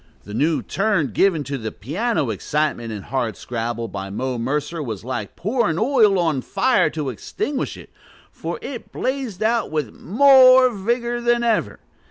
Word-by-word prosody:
The 105 - -10
new 150 +8 +1
turn 195 - 0
given 170 - +2
to 140 0 -4
the 110 -1 -4
piano 160 - -1
excitement 120 - -2
in 105 -3 -6
Hardscrabble 115 -1 -3
by 95 +1 -6
Mo 125 +4 -3
Mercer 150 +6 -2
was 110 -8 -5
like 120 -5 -5
pouring 210 -4 0
oil 220 -4 +4
on 160 -6 +1
fire 255 - +2
to 150 -3 -3
extinguish 285 - -4
it, - - -13 0.4
for - - -5
it 245 -5 -7
blazed 255 -7 -3
out 230 +1 +1
with 150 -7 -3
more 255 - +6
vigor 235 +3 -1
than 240 0 +2
ever. 230 -2 0
165 Hz, 155 wpm, -21 LUFS, -, 0.4 s, more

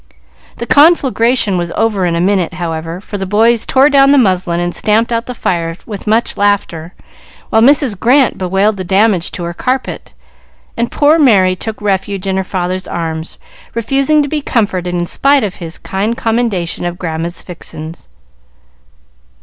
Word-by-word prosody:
The 235 - -4
conflagration 255 - +3
was 170 -1 -3
over 210 -5 0
in 170 - -1
a - - -1
minute, 185 -1 0
however, 165 -1 -4
for 205 +1 -7
the 195 - -4
boys 225 +3 +2
tore 270 +2 +4
down 275 -2 +4
the 285 - +5
muslin 185 -7 +1
and 175 0 -2
stamped 220 +3 +1
out 230 0 -2
the 250 - -6
fire 165 -5 -2
with 210 -2 -8
much 225 +2 0
laughter, 190 -5 -1 0.6
while 220 - +4
Mrs. 260 -5 +3
Grant 255 +4 +3
bewailed 195 +3 0
the 185 - -4
damage 195 -1 +2
to 175 - -5
her 170 0 -4
carpet, 255 +8 -4 0.6
and 235 0 -2
poor 300 +3 +3
Merry 195 -10 +4
took 220 +4 -6
refuge 195 -1 -2
in 190 -1 -1
her 190 - 0
father's 185 0 -3
arms, 160 -1 -5 0.4
refusing 275 +6 +1
to - - -3
be 300 +1 -2
comforted 200 -9 -1
in 175 0 -1
spite 275 +7 +2
of 200 -3 -4
his 165 -2 -7
kind 210 +5 -3
commendation 220 -9 -1
of 175 0 -3
"Grandma's 170 -1 -4
fixins." 165 - -9
200 Hz, 165 wpm, -14 LUFS, 175-235 Hz, 0.6 s, the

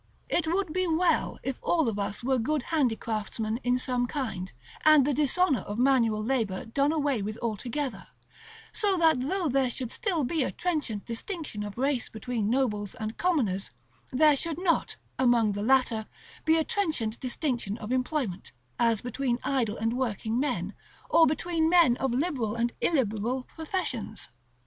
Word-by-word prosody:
It 335 -2 +1
would 355 -1 0
be 370 0 +1
well 340 +2 +1
if 265 -2 -3
all 325 -6 +2
of 210 -2 -1
us 200 +3 -3
were 260 0 +2
good 290 +4 0
handicraftsmen 225 -5 -1
in 245 0 +2
some 250 -1 0
kind, 225 -10 -4 0.3
and 310 -3 +7
the 290 - +1
dishonor 300 +1 +2
of 205 - -6
manual 235 -4 +3
labor 220 -6 -1
done 275 +6 +1
away 290 -7 0
with 215 +2 -4
altogether; 235 +1 -3 0.6
so 400 -3 +1
that 320 -5 +4
though 345 +7 -1
there 270 -2 +2
should 245 -1 -4
still 370 - 0
be 310 +5 0
a 255 - 0
trenchant 295 - -2
distinction 250 - -5
of 205 0 -6
race 270 -1 0
between 220 -1 -2
nobles 215 -6 0
and 220 -1 -5
commoners, 245 - +1 0.4
there 300 +3 +5
should 325 +2 -2
not, 350 -2 +1 0.2
among 240 -4 +4
the 205 0 -3
latter, 230 -2 +2 0.4
be 320 +1 +4
a 320 - +2
trenchant 310 - -1
distinction 245 -5 -2
of 220 0 -6
employment, 255 - -2 0.3
as 230 -3 +3
between 245 0 -1
idle 255 -5 0
and 225 +1 0
working 230 -2 -1
men, 290 +2 -1 0.4
or 325 - +6
between 320 +1 +1
men 335 -8 +5
of 265 -2 0
liberal 250 -5 -1
and 235 0 0
illiberal 250 -3 0
professions. 320 - -4
255 Hz, 160 wpm, -28 LUFS, 225-310 Hz, 0.6 s, and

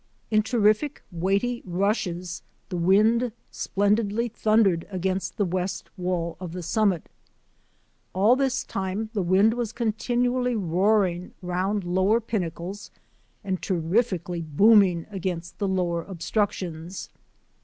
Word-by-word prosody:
In 215 -1 +4
terrific, 220 +5 +1
weighty 195 +8 0
rushes 180 -2 -1 0.3
the 185 - -4
wind 215 +7 +3 0.2
splendidly 210 +3 0
thundered 215 -6 +2
against 190 0 -2
the 205 - +2
west 185 +1 -3
wall 175 -2 -2
of 180 -3 -6
the 180 -1 -5
summit. 190 -1 +1 1.0
All 205 +6 +4
this 265 -1 0
time 195 +3 -3
the 205 - 0
wind 190 +5 +4
was 240 -2 -2
continuously 245 +2 0
roaring 185 -1 +1
round 185 +3 -1
lower 190 +5 +2
pinnacles 195 -3 -4 0.5
and 190 -2 -2
terrifically 180 -1 0
booming 180 +2 +4
against 175 -3 -4
the 200 - 0
lower 180 -3 0
obstructions. 185 -2 -3
195 Hz, 110 wpm, -25 LUFS, 180-215 Hz, 1.0 s, In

